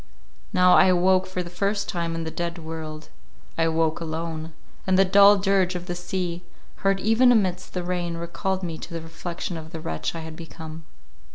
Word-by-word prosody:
Now 180 0 +5
I - - +7
awoke 185 +1 +3
for 185 -1 -3
the 170 - -9
first 200 +3 -1
time 170 -2 -2
in 165 - -3
the 160 - -4
dead 170 +1 -3
world—I 160 0 -8
awoke 160 0 +1
alone—and 160 +2 -4
the 195 - +6
dull 200 +2 +7
dirge 195 -2 +2
of 175 0 -4
the 175 - -3
sea, 175 0 -3 0.4
heard 195 0 +1
even 225 +5 +5
amidst 185 -6 +1
the 180 - -1
rain, 175 -1 -2
recalled 185 +3 -3
me 165 -3 -4
to 170 - -8
the 165 - -4
reflection 170 +1 -5
of 160 0 -8
the 165 - -6
wretch 80 - -3
I 165 - -5
had 160 0 -8
become. 160 -1 -9
175 Hz, 185 wpm, -25 LUFS, 165-185 Hz, 0.4 s, I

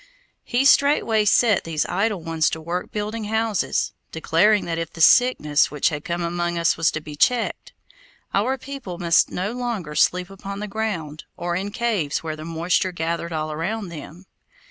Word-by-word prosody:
He 250 +3 0
straightway 275 -7 +4
set 215 0 +4
these 160 -2 -1
idle 195 -2 -1
ones 165 -1 +1
to 160 - -4
work 170 +3 -4
building 215 +1 -3
houses, 220 -1 0 0.2
declaring 190 +6 +2
that 165 -1 -2
if 165 -1 -4
the - - -12
sickness 160 - +4
which 150 - +1
had 150 -2 -5
come 170 0 -3
among 175 0 -2
us 170 -1 +2
was 165 0 +2
to 155 - -3
be 150 -1 -9
checked, 240 +9 0 0.6
our 245 +7 +1
people 260 -9 -7
must 170 -2 +3
no 190 +4 -3
longer 235 -10 -4
sleep 180 +4 +2
upon 195 +1 -7
the 210 - -4
ground, 190 -8 -4
or 175 0 -2
in 195 +3 -2
caves 205 -11 -1
where 155 -1 -4
the 155 - -9
moisture 170 +3 0
gathered 170 0 -3
all 155 -1 -3
around 190 +6 -3
them. 170 +3 -10
175 Hz, 175 wpm, -23 LUFS, 165-215 Hz, 0.6 s, straightway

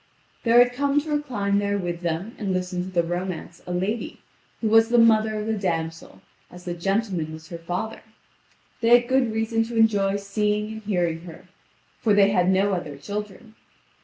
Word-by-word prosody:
There 230 0 +3
had 245 0 +6
come 280 +2 +1
to 305 +1 -7
recline 215 -10 0
there 205 0 0
with 175 -2 -4
them 175 +6 -3
and 200 -3 -2
listen 180 0 -2
to 185 - -5
the 175 -2 +1
romance 175 +1 -5
a - - -4
lady, 190 +6 -2 0.4
who 225 - -1
was 225 +1 +5
the 240 - +3
mother 220 -2 +4
of 210 - -4
the 220 - 0
damsel, 165 -5 -3 0.3
as 180 0 -13
the 175 - -3
gentleman 185 -2 -1
was 160 0 -11
her 170 - -7
father; 180 +7 -4 0.8
they 235 +1 +6
had 240 - -9
good 260 -2 +2
reason 225 +1 0
to 235 +1 -7
enjoy 205 -3 +3
seeing 210 +1 -1
and 220 - -8
hearing 175 -6 -1
her, 175 +2 -12 0.5
for 210 -3 +2
they 200 0 +5
had 180 -2 +2
no 195 +1 +2
other 150 -6 -4
children. 210 +7 -7
200 Hz, 190 wpm, -24 LUFS, 180-225 Hz, 0.8 s, had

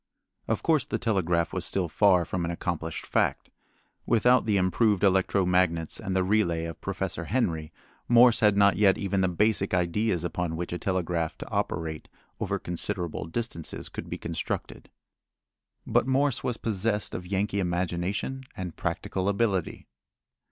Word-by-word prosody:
Of - - -1
course 155 -4 +3
the - - -1
telegraph 90 -7 0
was 95 - -2
still 95 -1 -1
far 90 0 +4
from 90 +1 -3
an 85 - -2
accomplished 85 -2 -4
fact. - - 0 0.6
Without 120 +2 +4
the 105 -2 +3
improved 100 +2 +2
electro 95 0 +3
magnets 90 -3 +1
and 95 - -3
the 95 - +3
relay 90 -4 +1
of 80 -1 -7
Professor - - -3
Henry, 85 -10 -1 0.4
Morse 120 0 +6
had 105 -2 +4
not 100 0 +5
yet 100 -2 +4
even 100 -1 0
the 95 - +3
basic 100 +1 +1
ideas 90 +1 0
upon 85 -1 -2
which 85 +1 -4
a 90 - -3
telegraph 85 -4 -1
to - - -8
operate 80 -1 -2 0.3
over - - -1
considerable 90 0 -3
distances 85 -2 -4
could - - -7
be - - -4
constructed. - - -5 1.0
But - - +2
Morse 135 0 +1
was 120 -2 -1
possessed 105 -1 -1
of 90 - -5
Yankee 100 +1 -1
imagination 95 +8 -2
and 90 -3 -5
practical 95 +3 -2
ability. 100 -3 -1
95 Hz, 150 wpm, -27 LUFS, 85-105 Hz, 1.0 s, Morse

